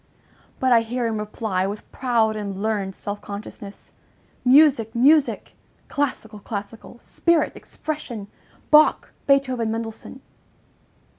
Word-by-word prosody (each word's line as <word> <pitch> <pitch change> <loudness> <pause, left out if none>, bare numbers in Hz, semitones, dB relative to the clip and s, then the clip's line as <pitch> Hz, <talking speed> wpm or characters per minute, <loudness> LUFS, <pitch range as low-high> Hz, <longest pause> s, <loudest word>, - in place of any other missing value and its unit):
But 260 -1 +2
I 235 -1 +6
hear 240 +2 -3
him 220 -2 -1
reply, 210 -3 -2
with 205 +2 -7
proud 230 -4 +1
and 200 -2 -5
learned 200 -3 -2
self 205 0 -6
consciousness: 205 0 -9 0.5
"Music, 255 -4 +5
music! 285 +4 +3 0.4
Classical, 235 -7 -3
classical! 210 +3 -7
Spirit! 335 +6 0
Expression! 265 -9 -6 0.5
Bach, 305 0 +5 0.2
Beethoven, 260 -5 +2
Mendelssohn!" 225 +3 -6
225 Hz, 105 wpm, -23 LUFS, 210-260 Hz, 0.5 s, I